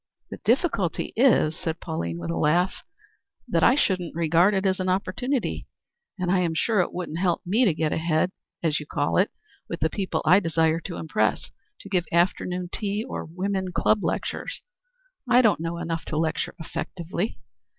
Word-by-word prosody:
"The - - -5
difficulty 230 - +1
is," 225 - +4
said 160 0 -4
Pauline, 85 - -3
with 85 -1 -4
a - - -2
laugh, 170 - +2 0.7
"that - - +1
I 250 - +6
shouldn't 185 - 0
regard 170 +4 +3
it 190 +1 0
as 190 0 +2
an 185 0 0
opportunity, 245 +8 -1 0.5
and 180 -2 -1
I 190 - +3
am 170 -3 0
sure 215 +5 +2
it - - -2
wouldn't 170 -2 -4
help 180 -2 +1
me 220 +8 +3
to 190 - +3
get 155 -1 0
ahead, 160 +2 +1 0.3
as 155 -2 +2
you 150 - -9
call 145 -1 0
it, 190 - +4 0.4
with - - -4
the - - +1
people 195 -3 -2
I 180 +5 +7
desire 165 -2 +1
to 175 - -5
impress, 110 -9 0 0.3
to 200 - -11
give 180 -3 +1
afternoon 180 +1 +1
tea 210 +1 -2
or - - -5
women 185 +2 -2
club 215 +3 +2
lectures. - - -3 0.7
I 250 +1 +6
don't 220 -7 +4
know 165 +1 -3
enough 165 -1 -3
to 155 - -3
lecture 160 0 -1
effectively. 175 +4 -4
175 Hz, 180 wpm, -25 LUFS, 160-195 Hz, 0.7 s, I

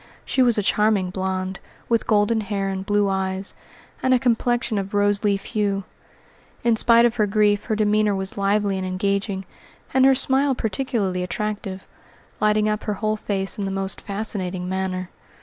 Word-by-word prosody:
She 265 - +1
was 240 -3 +4
a 210 - +1
charming 205 -3 +2
blonde, 190 0 -3 0.3
with 230 -1 +1
golden 215 +1 +2
hair 200 -2 -2
and 190 0 -3
blue 205 0 +1
eyes, 190 0 -2 0.5
and 260 0 +3
a - - +2
complexion 240 -2 +1
of 195 +1 -5
rose 205 0 +2
leaf 200 -2 +1
hue. 200 -3 -1 0.8
In 235 -1 +3
spite 235 +1 +5
of 240 0 +1
her 210 -2 +2
grief 205 0 +2
her 220 - -1
demeanour 210 -1 +2
was 190 0 -3
lively 200 -1 +1
and 185 - -3
engaging, 195 +1 -1 0.5
and 260 0 +4
her 265 0 +6
smile 270 +1 +2
particularly 215 -5 -1
attractive, 195 0 -4 0.5
lighting 215 0 +2
up 215 0 -2
her 210 - -1
whole 215 +2 -1
face 200 0 -2
in 200 - -1
the - - -2
most 195 0 -3
fascinating 195 -3 -3
manner. 185 -1 -3
205 Hz, 170 wpm, -23 LUFS, 195-220 Hz, 0.8 s, her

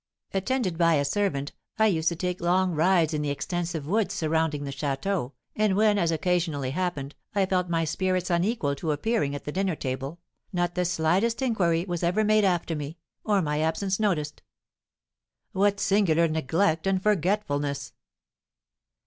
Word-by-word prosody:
Attended 195 -3 -1
by 165 -1 +4
a 145 -1 +1
servant, 145 -4 -1 0.3
I 220 - +4
used 165 -6 +2
to 170 - -4
take 180 +1 -3
long 180 +1 +2
rides 165 0 +3
in 150 - -1
the 150 - -1
extensive 165 +2 -3
woods 200 +4 0
surrounding 160 -4 0
the 140 - -4
château, 140 +1 -2 0.2
and 210 -2 +2
when, 210 0 +3
as 170 - +2
occasionally 165 -5 0
happened, 150 -4 -3 0.2
I 200 -1 +3
felt 185 -1 0
my 165 -1 +1
spirits 185 +2 -1
unequal 175 -4 +1
to 155 +1 -1
appearing 150 -3 0
at 145 - -6
the 150 - -4
dinner 190 0 0
table, 135 +4 -4 0.3
not 175 -2 0
the 180 0 0
slightest 180 +9 +1
inquiry 175 -9 +1
was 175 -2 -3
ever 180 +5 +2
made 215 -1 +4
after 175 -3 0
me, 150 +2 -6 0.3
or 205 -3 +2
my 150 -1 -1
absence 190 +5 0
noticed." 155 -9 -1 1.1
"What 200 0 +2
singular 170 -6 +3
neglect 160 +3 0
and 190 -1 +2
forgetfulness!" 145 - 0
175 Hz, 160 wpm, -26 LUFS, 155-195 Hz, 1.1 s, by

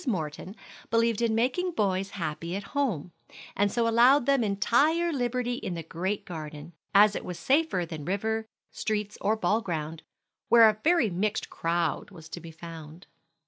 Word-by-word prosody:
Morton 180 -2 -3 0.3
believed 230 -1 +2
in 230 -2 +2
making 270 +11 0
boys 195 - 0
happy 170 +1 -3
at 200 - -4
home, 225 - -1 0.4
and 205 0 +2
so 235 -1 +1
allowed 240 +4 +5
them 275 -3 +3
entire 285 - +2
liberty 245 -2 -1
in 185 -7 -4
the 165 - -5
great 185 +6 -3
garden, 155 -1 -8 0.2
as 205 +1 +6
it - - -4
was 180 -2 -6
safer 275 - +1
than 160 -3 -7
river, 220 +4 -1 0.2
streets, 210 -1 -2
or 215 +2 +2
ball 220 0 +1
ground, 160 -4 -4 0.5
where 230 -1 +8
a 215 0 +1
very 330 - +3
mixed 200 +4 -2
crowd 170 +1 -1
was 165 -5 -13
to - - -6
be 165 - -10
found. 165 0 -10
205 Hz, 165 wpm, -28 LUFS, 170-235 Hz, 0.5 s, where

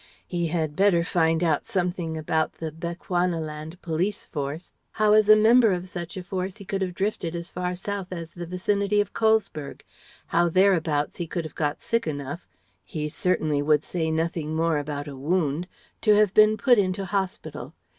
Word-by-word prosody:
He 170 -2 -1
had 160 -2 -1
better 190 -3 +4
find 165 -1 +1
out 160 +3 +1
something 180 -6 -1
about 155 0 0
the 160 -1 -5
Bechuanaland 170 -1 -3
Police 175 +5 -1
Force; 145 +3 -5 0.2
how 215 -1 +3
as 215 -1 +5
a 215 - +10
member 225 +1 +6
of 180 0 -2
such 175 0 -6
a 185 - -5
force 185 +2 -4
he 200 - -11
could 195 +1 -2
have 180 -2 -2
drifted 190 -4 -2
as 170 0 -5
far 180 0 -2
south 195 +1 -4
as 170 -3 -7
the 175 -1 -7
vicinity 200 +3 0
of 205 -1 0
Colesberg; 220 -10 0 0.4
how 170 +1 +2
thereabouts 165 -5 +2
he 175 - -3
could 170 +1 -3
have 155 - -8
got 150 -1 -2
sick 230 -5 -1
enough 145 +2 -5 0.4
he 150 -1 -4
certainly 155 -3 0
would 150 0 +3
say 165 -3 -2
nothing 160 -1 -1
more 165 -1 +1
about 145 0 -4
a 140 - -7
wound 155 +3 0 0.3
to 215 -2 +5
have 210 -2 +4
been 215 0 +6
put 245 -2 +4
into 190 0 0
hospital. 190 0 -4
175 Hz, 180 wpm, -25 LUFS, 160-195 Hz, 0.4 s, a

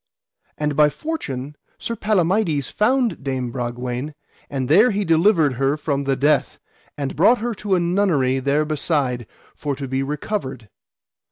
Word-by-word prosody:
And 150 -1 -1
by 150 +1 +5
fortune, 150 - -5 0.2
Sir 230 - -4
Palamides 185 - +1
found 240 - +1
Dame 130 -3 -2
Bragwaine, 125 +3 -4 0.3
and 135 -2 -2
there 205 - +6
he 205 -2 -1
delivered 165 -3 +3
her 135 +2 +2
from 140 -2 -2
the 135 0 +1
death, 145 +1 +1 0.4
and 140 -2 -3
brought 215 +10 +5
her 240 +1 -2
to 200 -2 +1
a - - +2
nunnery 170 -8 +1
there 140 +3 +1
beside, 140 -6 -1 0.3
for 145 -2 -3
to 135 0 -6
be 130 +1 -1
recovered. 135 - -4
150 Hz, 150 wpm, -21 LUFS, 135-190 Hz, 0.4 s, there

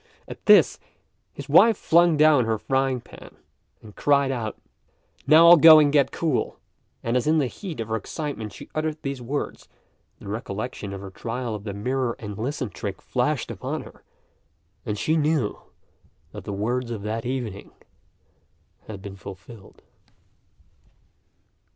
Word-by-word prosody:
At - - -11
this, - - +6 0.5
his 140 - -9
wife 200 +10 +6
flung 170 -1 +3
down 150 -5 +5
her 110 0 0
frying 130 +1 -1
pan, - - -14 0.5
and 105 -2 -13
cried 140 -2 +2
out, 115 -4 -4 0.7
"Now 160 +3 +7
I'll 175 +1 +10
go 160 0 +9
and 145 -2 +4
get 140 -3 +3
cool;" 160 -6 -1 0.5
and 115 +1 -1
as 125 +3 0
in 160 +1 +3
the 145 - +2
heat 165 - -7
of 115 - -3
her 110 0 -1
excitement 125 -3 -5
she - - -11
uttered 155 0 -2
these 135 -2 -4
words, 135 +5 -5 0.5
the - - -13
recollection 105 0 -5
of 100 -1 -7
her 100 -1 -9
trial 115 +3 -4
of 105 -1 -7
the 100 - -4
"mirror 125 +3 -1
and 105 -2 -7
listen" 125 +1 -4
trick - - -6
flashed - - -1
upon - - -5
her, - - -16 0.8
and 105 - -2
she 160 +9 +1
knew 150 -7 0 0.7
that - - -10
the - - -5
words 120 +5 -2
of 110 -4 -5
that 110 +2 -3
evening 120 -6 -5 1.2
had 100 -3 -9
been 100 -1 -8
fulfilled. 100 +2 -12
125 Hz, 155 wpm, -24 LUFS, 110-150 Hz, 1.2 s, I'll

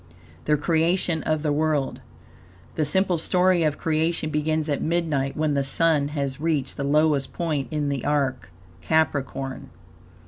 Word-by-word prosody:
THE 150 0 +3
CREATION 165 +2 +1
OF 155 -1 0
THE 150 -2 +1
WORLD 150 -2 0 0.7
The 155 - 0
simple 185 +2 +1
story 180 +1 +2
of 155 -2 +1
creation 160 0 0
begins 155 +1 0
at 145 -2 -1
midnight, 155 -5 -1
when 155 -1 +1
the 140 -1 +1
Sun 150 +1 +2
has 140 0 -2
reached 150 -5 -1
the 140 - -2
lowest 145 -1 +2
point 155 -6 -2
in 150 -2 -1
the 140 -3 -2
arc 135 -6 -1 0.3
Capricorn. 135 -3 -1
150 Hz, 145 wpm, -24 LUFS, 140-160 Hz, 0.7 s, THE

